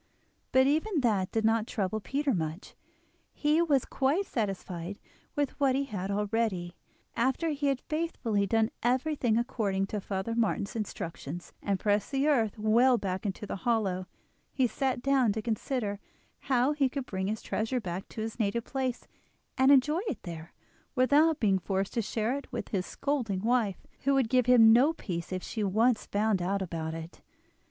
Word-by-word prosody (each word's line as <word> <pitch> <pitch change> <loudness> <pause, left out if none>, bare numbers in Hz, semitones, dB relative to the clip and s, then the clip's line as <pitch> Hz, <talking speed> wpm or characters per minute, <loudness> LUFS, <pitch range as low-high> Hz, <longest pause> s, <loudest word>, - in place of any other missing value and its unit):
But 260 0 +5
even 315 +4 +1
that 205 -6 +1
did 220 -1 0
not 225 0 +2
trouble 215 -2 -2
Peter 275 +5 -1
much; 160 0 -4 0.6
he 300 +2 +2
was 290 -6 +2
quite 290 +9 +1
satisfied 195 - -3 0.4
with 290 -3 0
what 270 -2 +3
he 275 - +1
had 200 -7 -4
already. 200 -3 -1 0.4
After 265 +7 +1
he 290 -1 -1
had 275 -2 0
faithfully 260 -11 -1
done 225 +1 +2
everything 255 -1 +1
according 205 -5 0
to 205 +1 -4
Father 190 +3 -3
Martin's 220 -2 0
instructions, 175 -6 -5
and 200 -2 -1
pressed 205 -1 +1
the 275 +1 +1
earth 230 -8 +2
well 235 +4 +4
back 190 -1 -3
into 195 +2 -4
the 200 - -4
hollow, 195 -5 0 0.4
he 260 - +2
sat 255 0 -1
down 265 -6 +3
to 220 - -3
consider 220 -2 -2 0.5
how 255 +1 +3
he 285 -3 +2
could 270 0 -4
bring 190 -3 -3
his 215 +1 -3
treasure 225 +4 -1
back 185 -3 -5
to 220 - -6
his 225 +2 -5
native 220 +2 0
place, 260 -2 -3 0.5
and 265 +1 +4
enjoy 300 +5 +4
it 290 - -4
there, 165 -2 -8 0.4
without 290 +5 +4
being 195 -4 +3
forced 195 +1 -2
to 235 - +1
share 220 +3 -1
it 280 -2 -7
with 245 - -4
his 185 -3 -2
scolding 225 -10 -2
wife, 225 -5 +1
who 275 0 +2
would 260 -4 +2
give 250 -1 +3
him 225 -3 +8
no 270 +7 +5
peace 175 - -5
if 185 -1 -3
she 220 - -3
once 220 +4 +2
found 205 -2 +1
out 195 +2 0
about 160 -2 -4
it. 165 +1 -9
225 Hz, 175 wpm, -29 LUFS, 195-265 Hz, 0.6 s, him